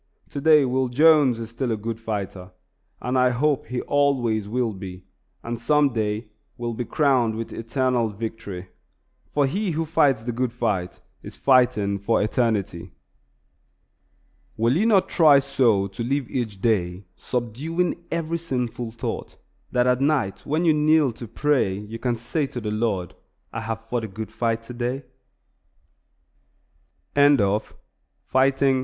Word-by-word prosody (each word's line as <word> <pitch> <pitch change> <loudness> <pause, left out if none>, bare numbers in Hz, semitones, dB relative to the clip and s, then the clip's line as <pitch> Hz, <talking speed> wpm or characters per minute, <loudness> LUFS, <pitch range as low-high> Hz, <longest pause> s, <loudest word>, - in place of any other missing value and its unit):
Today 150 0 +4
Will 130 +1 +1
Jones 145 -2 +5
is 115 0 -6
still 120 +1 -2
a 110 - 0
good 115 +1 -4
fighter, 100 -4 -5 0.5
and 125 +1 -2
I 125 0 +5
hope 140 +3 0
he 125 +1 -3
always 125 -7 +1
will 120 -1 0
be, 95 -2 -8 0.4
and 115 0 -5
some 150 +1 +3
day 110 0 -1 0.3
will 120 -1 -3
be 120 +2 -4
crowned 130 -7 +2
with 115 0 -5
eternal 120 0 0
victory; 100 -4 -6 0.6
for 145 -1 +2
he 195 +9 -1
who 165 0 -1
fights 145 -7 +2
the 120 - -2
good 120 0 -2
fight 105 -7 -2 0.2
is - - -10
fighting 120 -7 +3
for 105 +4 +1
eternity. 105 -6 -1 1.6
Will 115 +4 +2
you 210 +7 +2
not 195 -4 +4
try 155 -4 +6
so 130 -8 +2
to 100 +5 -5
live 135 +1 -1
each 110 -6 -3
day, 95 -4 0
subduing 155 +9 -2
every 165 0 -2
sinful 125 -7 -3
thought, 115 - -5 0.3
that 125 0 +2
at 125 +1 +2
night 140 -9 0
when 155 +4 +1
you 160 - +5
kneel 150 -2 +3
to 115 +1 -9
pray 125 -4 +1
you 105 +3 -7
can 120 0 0
say 135 +6 -2
to 125 - -6
the 105 -2 -4
Lord, 105 -5 -1 0.4
"I 115 - -3
have 115 0 -5
fought 120 -1 -2
a - - -5
good 110 +2 -7
fight 115 -1 -1
today"? 125 +3 -4 2.1
S. 145 0 +6
W. 100 0 +2 0.7
VAN 130 +1 +4
TRUMP. 135 0 +2
120 Hz, 150 wpm, -24 LUFS, 110-140 Hz, 2.1 s, try